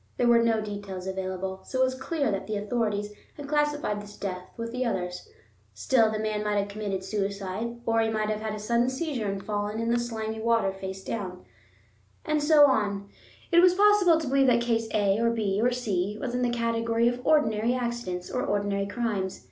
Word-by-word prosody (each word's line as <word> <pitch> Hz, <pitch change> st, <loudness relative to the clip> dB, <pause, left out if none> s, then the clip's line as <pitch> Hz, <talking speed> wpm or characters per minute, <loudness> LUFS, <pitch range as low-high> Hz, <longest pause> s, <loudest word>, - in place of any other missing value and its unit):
There 245 Hz, -, +2 dB
were 235 Hz, -1 st, +6 dB
no 225 Hz, -1 st, +2 dB
details 200 Hz, -3 st, -6 dB
available, 190 Hz, 0 st, -4 dB
so 260 Hz, -, -4 dB
it -, -, +5 dB
was 260 Hz, 0 st, +1 dB
clear 275 Hz, 0 st, -1 dB
that 195 Hz, -, -3 dB
the 215 Hz, -1 st, -2 dB
authorities 210 Hz, -1 st, -1 dB, 0.2 s
had 290 Hz, -1 st, -7 dB
classified 295 Hz, -7 st, 0 dB
this 205 Hz, 0 st, -12 dB
death 185 Hz, -2 st, -5 dB
with 230 Hz, 0 st, -4 dB
the 250 Hz, +1 st, -1 dB
others; 180 Hz, -6 st, -3 dB, 0.5 s
still, 220 Hz, -, +3 dB
the 215 Hz, -, -2 dB
man 215 Hz, -1 st, -2 dB
might 210 Hz, -1 st, 0 dB
have 200 Hz, 0 st, 0 dB
committed 200 Hz, -2 st, -3 dB
suicide, 200 Hz, +3 st, -3 dB
or 225 Hz, 0 st, +2 dB
he 225 Hz, -, +1 dB
might 215 Hz, -1 st, -1 dB
have 215 Hz, 0 st, -3 dB
had 215 Hz, -1 st, -3 dB
a -, -, -6 dB
sudden 235 Hz, +3 st, +1 dB
seizure 260 Hz, -5 st, -2 dB
and 195 Hz, 0 st, -4 dB
fallen 210 Hz, +1 st, -2 dB
in 230 Hz, 0 st, 0 dB
the 240 Hz, -, +2 dB
slimy 220 Hz, -2 st, -4 dB
water 225 Hz, -3 st, +2 dB
face 190 Hz, 0 st, -7 dB
downwards. 185 Hz, -4 st, -5 dB, 0.8 s
And 305 Hz, -1 st, +1 dB
so 295 Hz, -1 st, +7 dB
on: 200 Hz, -7 st, 0 dB, 0.4 s
it 340 Hz, -, +6 dB
was 360 Hz, 0 st, +6 dB
possible 400 Hz, -4 st, +5 dB
to 315 Hz, -, -4 dB
believe 270 Hz, +1 st, +3 dB
that 235 Hz, -1 st, +4 dB
case 230 Hz, -1 st, 0 dB
A 205 Hz, -1 st, +2 dB
or 230 Hz, 0 st, +3 dB
B 210 Hz, -3 st, 0 dB
or 245 Hz, -, +4 dB
C 210 Hz, -5 st, -1 dB
was 245 Hz, 0 st, -3 dB
in 250 Hz, -, -1 dB
the 245 Hz, -, +2 dB
category 230 Hz, 0 st, +1 dB
of 245 Hz, +1 st, -1 dB
ordinary 235 Hz, -6 st, +2 dB
accidents 235 Hz, -8 st, -3 dB
or 250 Hz, -, -1 dB
ordinary 200 Hz, -1 st, -1 dB
crimes. 205 Hz, -4 st, -2 dB
220 Hz, 205 wpm, -27 LUFS, 200-245 Hz, 0.8 s, so